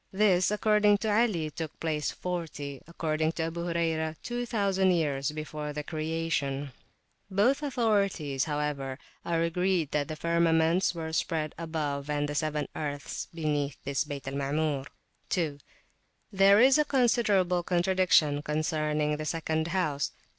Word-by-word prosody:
This, 190 -2 +3
according 210 0 +3
to 215 +1 -1
Ali, 205 -9 +1
took 160 +1 -6
place 155 -2 -1
40, 155 -6 -5
according 160 -1 -1
to 165 - -2
Abu 170 +1 -3
Hurayrah, 160 -2 0
2,000 205 -6 0
years 150 -5 +1
before 150 -1 -5
the 150 0 -4
creation; 155 -3 -2 0.6
both 210 +9 +2
authorities, 200 - 0
however, 145 -3 -2 0.3
are 165 -1 0
agreed 180 -2 0
that 145 -1 0
the 155 - -4
firmaments 170 +2 +2
were 160 -1 -5
spread 155 -2 -1
above 150 -3 -3
and 145 0 0
the 145 - -4
seven 150 0 -1
earths 145 -1 -4
beneath 150 -4 -1
this 140 0 0
Bayt 145 -3 -7
al 135 - -3
Maamur. 140 0 -1 0.4
2. 155 -6 -1 0.7
There 195 +1 +6
is 265 +5 +6
considerable 210 -9 +2
contradiction 175 -4 +3
concerning 150 0 0
the 155 - -4
second 160 0 -1
house. 155 -6 -1
160 Hz, 130 wpm, -29 LUFS, 150-185 Hz, 0.7 s, There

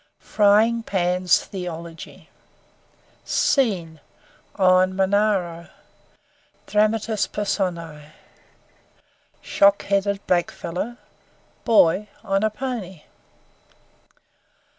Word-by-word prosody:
Frying 215 +3 +2
Pan's 180 -3 +1
Theology 170 -3 -9 0.9
Scene: 180 - 0 0.6
On 185 -1 +3
Monaro. 190 -3 0 1.0
DRAMATIS 215 0 0
PERSONAE: 170 -7 -4 1.3
Shock 200 0 +3
headed 200 0 -1
blackfellow, 180 +5 -2 0.7
Boy 210 -3 +3
(on 195 0 0
a 220 - +2
pony). 215 - -6
195 Hz, 60 wpm, -22 LUFS, 175-210 Hz, 1.3 s, On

